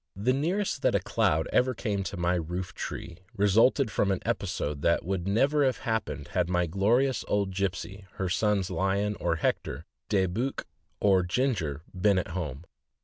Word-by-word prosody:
The 110 +7 +1
nearest 175 +9 -1
that - - +2
a - - +4
cloud 80 +1 +1
ever 130 0 +3
came 105 -3 -2
to 95 - -5
my 85 0 +1
roof 90 +1 -3
tree 85 -2 -6 0.2
resulted 110 +5 +4
from 100 - +1
an 95 -2 +1
episode 75 -1 -2
that 85 +1 +2
would 95 -1 -2
never 140 +9 +3
have 130 -2 +2
happened 75 - -2
had 90 -2 0
my 90 -1 +2
glorious 115 +9 +2
old 100 -2 0
Gipsey, 95 +1 -3
her 95 - -2
sons 100 0 +1
Lion 100 +2 0
or - - +1
Hector, - - -2 0.2
De 95 -2 +3
Buch 115 +10 -2 0.3
or 95 -2 +4
Ginger, 90 - -1
been 100 +2 +3
at 90 - -1
home. 85 -4 -5
95 Hz, 170 wpm, -28 LUFS, 90-110 Hz, 0.3 s, a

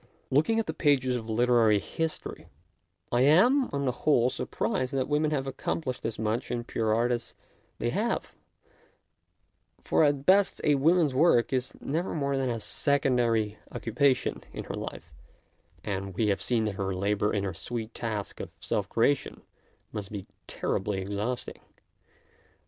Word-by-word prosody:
Looking 155 +12 +3
at 225 - 0
the - - -3
pages 130 -4 +2
of 115 -2 -5
literary 115 -2 +4
history, 160 +10 -4 0.6
I 120 - +3
am, 235 - +5
on 140 0 -1
the 130 - +2
whole, 125 -1 +2
surprised 130 +1 -2
that 130 -1 0
women 150 +1 +1
have 140 -3 -1
accomplished 135 0 -3
as 115 -1 -2
much 110 +3 -1
in 120 -1 -2
pure 110 -2 -1
art 120 +3 +2
as 120 -1 -3 0.4
they - - -1
have, - - -1 1.5
for - - +3
at 145 -2 +2
best 195 +2 +4
a 150 - +4
woman's 155 +1 +3
work 130 -4 +4
is 130 0 -1
never 165 +6 -2
more 140 -2 0
than 135 -1 0
a 115 -1 -2
secondary 120 -5 +1
occupation 130 +3 +1
in - - -6
her - - -6
life, - - -7 0.7
and 95 -2 -4
we 110 +1 +1
have 100 - 0
seen 115 -3 +1
that 100 -3 -3
her 95 -1 -1
labour 105 +2 +1
in 100 - 0
her 95 -2 -2
sweet 115 +5 -5
task 110 -4 -4
of - - -5
self - - -2
creation 130 +4 +1 0.5
must 105 -1 -6
be 100 -3 -5 0.2
terribly 95 0 -2
exhausting. 105 +6 -3
125 Hz, 155 wpm, -28 LUFS, 110-140 Hz, 1.5 s, am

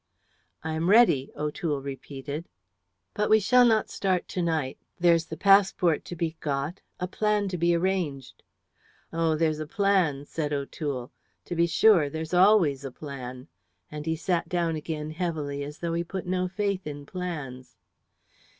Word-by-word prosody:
"I 160 0 -3
am 160 +3 0
ready," 200 - +5
O'Toole 150 -1 -2
repeated. 140 +3 -6 0.6
"But 210 0 0
we 220 - +6
shall 245 +4 +5
not 220 -2 +2
start 185 -3 0
to 180 - -2
night. 160 -6 -1 0.2
There's 170 -2 +4
the 160 - -7
passport 190 -4 +4
to 175 - -6
be 165 -1 -3
got, 145 +5 -3 0.2
a 180 - -2
plan 210 +1 0
to 180 - -3
be 170 +1 +3
arranged." 170 -7 -2 0.7
"Oh, 165 -1 +1
there's 155 -1 +1
a 155 - -4
plan," 175 -7 +1
said 150 -1 -3
O'Toole. 140 -2 -4 0.3
"To 175 - -4
be 170 0 +3
sure, 170 -4 +5
there's 160 +3 -5
always 180 -7 +4
a 135 - -4
plan." 130 -2 -8 0.4
And 150 +1 -6
he 160 - +1
sat 175 +1 -1
down 170 -2 0
again 155 0 -4
heavily, 155 -4 -3
as 145 +1 -7
though 170 -1 -3
he 170 +1 0
put 185 +2 -5
no 185 0 0
faith 195 -1 -2
in 145 -1 -7
plans. 150 -8 -6
165 Hz, 160 wpm, -27 LUFS, 145-185 Hz, 0.7 s, we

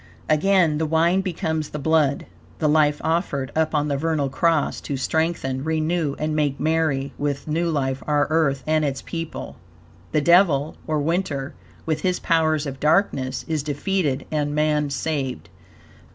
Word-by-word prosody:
Again, 160 -1 +3
the 160 - 0
wine 170 +4 +3
becomes 160 -4 -2
the - - -5
blood 150 -1 +1 0.3
the 155 - +1
life 150 -1 +3
offered 160 -5 -1
up 160 0 +1
on 150 0 +1
the 140 -1 0
vernal 155 -2 0
cross 160 +2 +1
to 140 - -4
strengthen, 135 -2 -1
renew 160 -1 0
and 155 0 -2
make 145 -3 0
merry 155 -3 0
with 145 0 -2
new 165 +3 0
life 135 -4 -1
our 145 -1 +3
Earth 150 -4 +1
and 155 0 +2
its 135 -2 -2
people. 165 -1 -6 0.5
The - - +2
devil 160 -2 +4
(or 155 - 0
winter), 150 -3 -1 0.3
with 155 -1 -1
his 180 +1 0
powers 155 -2 +1
of 135 -1 -6
darkness, 150 -5 +1
is 155 -2 -1
defeated 145 -1 -1
and 145 -1 -1
man 150 -1 +1
saved. 140 -2 -3
155 Hz, 155 wpm, -23 LUFS, 140-160 Hz, 0.5 s, devil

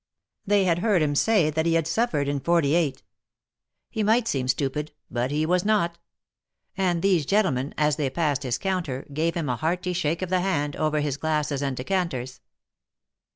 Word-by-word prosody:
They 205 -1 +4
had 175 -2 +2
heard 195 -5 +2
him 145 -1 +1
say 175 0 +3
that 160 +2 0
he 165 - +2
had 165 -2 +2
suffered 165 -5 0
in 140 0 -1
^8. 155 -2 +1 0.9
He 220 - -2
might 225 +2 +3
seem 130 - -1
stupid, 150 +3 -1 0.2
but 120 +1 -1
he 150 +2 0
was 180 +2 +2
not; 175 -6 +1 0.8
and 180 -3 0
these 185 -5 +3
gentlemen, 145 -7 0
as 150 -1 +2
they 145 -4 0
passed 145 -1 0
his 125 -3 -1
counter, 175 -9 -2
gave 160 +3 0
him 165 -4 -2
a 125 -1 -1
hearty 180 +4 -1
shake 170 0 -1
of 185 - -3
the 185 -1 +2
hand, 145 -6 -1
over 155 -1 0
his 145 -2 -2
glasses 150 -2 -1
and 135 -2 -2
decanters. 130 -5 -2
155 Hz, 180 wpm, -25 LUFS, 145-180 Hz, 0.9 s, They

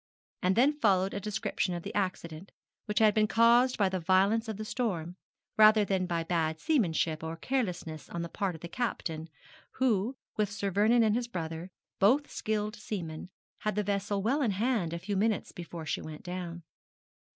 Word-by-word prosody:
And 185 +1 +2
then 285 +6 +3
followed 195 -5 +3
a - - -2
description 205 -3 -2
of 170 - -5
the - - -6
accident, 185 -3 -3 0.3
which 210 - -4
had 215 -2 +5
been 215 0 +3
caused 235 +3 +4
by 200 - +3
the 185 0 -1
violence 195 +6 +3
of 220 -2 -4
the 215 - -5
storm, 180 -9 -2 0.4
rather 215 -1 +7
than 190 -2 0
by 170 -2 -1
bad 160 -2 -1
seamanship 165 - +1
or 160 0 -4
carelessness 180 - -3
on 170 0 -4
the - - -4
part 185 +1 -2
of 160 - -12
the 170 - -5
captain, 170 -6 -3 0.4
who, 240 -1 +1 0.2
with 210 -2 +1
Sir 200 -1 -3
Vernon 220 +5 +4
and 215 -1 +3
his 240 0 -1
brother, 165 -4 -5 0.3
both 260 +9 +3
skilled 215 0 -2
seamen, 180 -7 -6 0.3
had 215 -2 -2
the 210 - +1
vessel 200 0 -1
well 270 +7 +1
in 245 - +2
hand 220 -7 +1
a 170 - -3
few 200 +4 -3
minutes 215 +1 0
before 170 -2 -8
she - - -2
went 155 -1 -9
down. 175 -1 -6
200 Hz, 185 wpm, -30 LUFS, 170-220 Hz, 0.4 s, rather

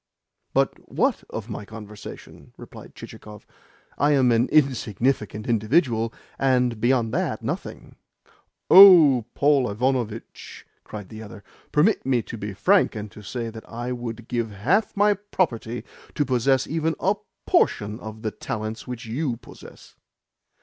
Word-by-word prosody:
"But - - +1
WHAT - - 0
of - - -6
my - - -6
conversation?" 105 -1 -11
replied - - -12
Chichikov. 105 -1 -11 0.5
"I 145 +2 +3
am 130 -3 +4
an 115 +2 +2
insignificant 120 -5 0
individual, 115 0 +1 0.3
and, 125 -4 +1
beyond 120 -2 +1
that, 160 -8 -2
nothing." - - -6 0.7
"Oh, 165 - +9
Paul 140 -4 +3
Ivanovitch!" 115 0 -3 0.2
cried 105 -3 -9
the 110 0 -9
other. 105 -1 -11 0.3
"Permit 170 +9 +3
me 125 -3 +1
to 115 - -8
be 105 -1 -5
frank, 190 - +3
and 105 -1 -6
to 105 - -12
say 115 +3 -5
that 110 0 -12
I 120 +2 -5
would 120 -2 -6
give 115 -2 -2
half 150 - 0
my 205 +1 +4
property 165 - -3 0.3
to 145 - +1
possess 130 +1 +2
even 160 +1 -1
a 200 +3 +1 0.3
PORTION 105 +2 +1
of 110 -1 -9
the 110 - -2
talents 110 0 -6
which 125 -1 -6
you 120 +2 -2
possess." - - -15
120 Hz, 140 wpm, -24 LUFS, 110-140 Hz, 0.7 s, Oh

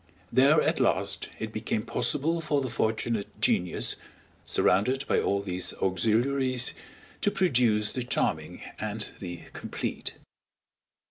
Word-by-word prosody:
There 140 +4 +6
at - - +1
last - - 0
it 110 0 -5
became 110 0 -2
possible 150 +7 0
for 150 -2 +1
the 130 -3 -3
fortunate 110 -2 -1
genius, 90 0 +1 0.5
surrounded 130 +8 +2
by - - +2
all 100 0 0
these 90 -2 -3
auxiliaries, 120 +7 +1 0.5
to - - +4
produce 120 - +2
the 130 - -2
charming 90 -8 -1 0.2
and 105 0 -3
the 90 -2 -6
complete. - - -3
115 Hz, 120 wpm, -28 LUFS, 100-135 Hz, 0.5 s, There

